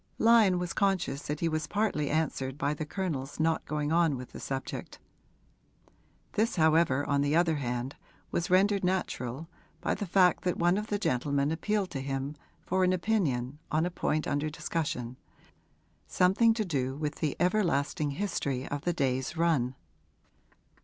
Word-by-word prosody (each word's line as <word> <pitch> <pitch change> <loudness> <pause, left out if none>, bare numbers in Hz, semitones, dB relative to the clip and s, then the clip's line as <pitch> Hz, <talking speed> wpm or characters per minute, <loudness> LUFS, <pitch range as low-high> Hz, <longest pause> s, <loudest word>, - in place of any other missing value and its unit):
Lyon 225 -5 +5
was 175 -1 -3
conscious 185 -8 0
that 150 +1 -3
he 170 - +2
was 155 -1 -1
partly 160 -7 0
answered 140 -4 -1
by 145 -1 0
the 150 0 -5
Colonel's 150 -8 -3
not 160 +1 +1
going 150 0 -2
on 165 -4 +3
with 125 0 -9
the - - -9
subject. 135 -1 -5 1.4
This 220 +2 +1
however 160 -4 +3
on 140 -1 +1
the 145 +2 +1
other 165 -2 +3
hand 125 0 -3 0.4
was 170 - -1
rendered 195 +2 +3
natural 160 -6 -2 0.3
by - - 0
the 205 0 -4
fact 180 0 +4
that 180 - 0
one 175 +3 +3
of 210 - -5
the 205 - 0
gentlemen 140 - 0
appealed 195 +4 -1
to 135 - -3
him 135 +2 -3 0.3
for 185 +1 +1
an 185 0 +3
opinion 150 - 0
on 155 +2 +2
a 180 - -2
point 155 -3 -1
under 145 +2 0
discussion, 135 -6 -3 0.9
something 210 +5 +4
to 220 -2 -1
do 135 -6 -1
with 150 0 -3
the 150 -4 -1
everlasting 175 -5 +1
history 140 -6 -2
of 145 0 -3
the 175 - 0
day's 130 -1 -1
run. 145 -7 +1
155 Hz, 160 wpm, -29 LUFS, 140-180 Hz, 1.4 s, Lyon